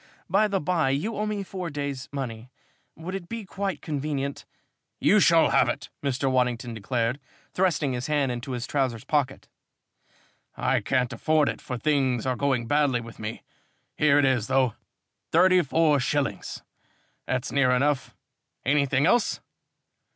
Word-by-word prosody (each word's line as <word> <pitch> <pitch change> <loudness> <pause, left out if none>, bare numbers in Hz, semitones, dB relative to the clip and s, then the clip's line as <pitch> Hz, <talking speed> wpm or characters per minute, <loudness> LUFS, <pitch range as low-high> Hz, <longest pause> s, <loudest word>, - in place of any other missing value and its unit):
"By 200 +4 +3
the 200 -2 0
bye, 160 -3 +1
you 150 +12 -1
owe 210 +1 -1
me 210 -1 -2
four 185 -2 -5
days' 140 -2 -4
money. 125 -4 -5 0.5
Would 165 +4 -7
it 190 -3 -6
be 230 -2 -5
quite 195 0 -4
convenient 140 -2 -3 0.3
?" - - -54
"You - - +6
shall - - +5
have - - +4
it," - - -4
Mr. 135 -1 0
Waddington 125 -2 0
declared, 115 +4 -1 0.3
thrusting 165 -7 +1
his 125 +2 -3
hand 145 -4 +1
into 125 +2 -5
his 120 -1 -3
trousers 130 -5 -1
pocket. 140 -2 -1 1.1
"I - - +1
can't 130 -1 0
afford 155 +5 +2
it, - - -5
for 125 - -5
things 130 -4 +1
are 130 -1 0
going 130 -2 0
badly 145 -1 +2
with 115 -1 -11
me. 110 +1 -6 0.5
Here 150 -1 +4
it 145 - +4
is, 125 -5 +1
though. 130 -4 +2 0.6
Thirty 185 0 +5
four 155 -1 +2
shillings 140 +1 -2 0.6
that's 130 -1 -2
near 140 -2 +3
enough. 135 +2 +1 0.5
Anything 140 0 +2
else?" 235 +5 +2
140 Hz, 155 wpm, -26 LUFS, 125-155 Hz, 1.1 s, You